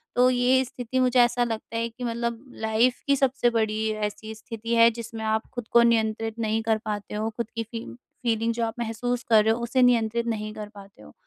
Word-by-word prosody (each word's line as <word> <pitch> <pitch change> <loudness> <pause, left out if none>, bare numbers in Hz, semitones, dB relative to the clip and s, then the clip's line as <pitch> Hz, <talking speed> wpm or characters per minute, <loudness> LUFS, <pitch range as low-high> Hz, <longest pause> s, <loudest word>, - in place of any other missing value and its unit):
तो 250 +1 +5
ये 255 +1 +3
स्थिति 250 +1 -4
मुझे 255 0 +3
ऐसा 240 0 +3
लगता 225 -1 -4
है 230 0 -1
कि 235 +2 -10
मतलब 235 0 -3 0.2
लाइफ़ 225 +3 +2
की 280 - +4
सबसे 270 -2 +2
बड़ी 220 -1 0 0.2
ऐसी 220 +1 -8
स्थिति 230 +1 -4
है 230 0 +7
जिसमें 230 -1 -7
आप 220 0 +1
खुद 245 -3 -6
को 235 - +6
नियंत्रित 225 -1 +1
नहीं 220 0 0
कर 220 -1 +2
पाते 205 -2 -4
हो 215 +1 -1
खुद 235 -1 -3
की 230 - -1
फी 230 +1 -7 0.4
फ़ीलिंग 230 -1 +1
जो 230 0 -1
आप 225 - -3
महसूस 240 +1 -2
कर 220 -2 +6
रहे 220 - +3
हो 230 - -4
उसे 245 +2 +1
नियंत्रित 235 -1 +3
नहीं 215 -2 -3
कर 215 -1 -7
पाते 200 -1 -14
हो। 75 - -15
230 Hz, 220 wpm, -25 LUFS, 220-240 Hz, 0.4 s, है